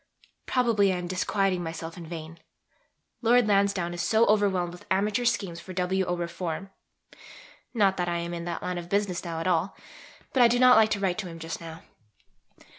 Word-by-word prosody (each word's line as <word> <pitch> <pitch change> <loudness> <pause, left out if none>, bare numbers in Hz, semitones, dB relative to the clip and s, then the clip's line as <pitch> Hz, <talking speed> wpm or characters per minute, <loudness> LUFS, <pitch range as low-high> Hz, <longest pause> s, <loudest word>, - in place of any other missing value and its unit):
Probably 230 -6 +2
I 185 - -1
am 180 - -4
disquieting 185 0 0
myself 165 0 -6
in 170 -2 -9
vain. 165 0 -8 0.8
Lord 240 -1 +4
Lansdowne 200 -4 +1
is 175 - -3
so 225 +1 +3
overwhelmed 195 -4 +2
with 175 - -13
amateur 205 +5 +1
schemes 185 -7 0
for 185 +2 -9
W. 185 +1 0
O. 175 - 0
reform 175 +2 -4 1.0
not 195 -4 +3
that 175 -1 -1
I 170 - -1
am 170 0 -4
in 170 0 -5
that 170 -1 -4
line 180 -1 -2
of 170 0 -9
business 200 -2 0
now 165 -2 -4
at 165 - -4
all; 180 +1 0 0.6
but 260 - +3
I 240 - +8
do 240 +1 +2
not 250 0 +7
like 220 -1 +5
to 205 - -1
write 190 -1 0
to 195 - -4
him 165 -1 -9
just 165 +1 -6
now. 165 0 -9
185 Hz, 195 wpm, -27 LUFS, 170-205 Hz, 1.0 s, I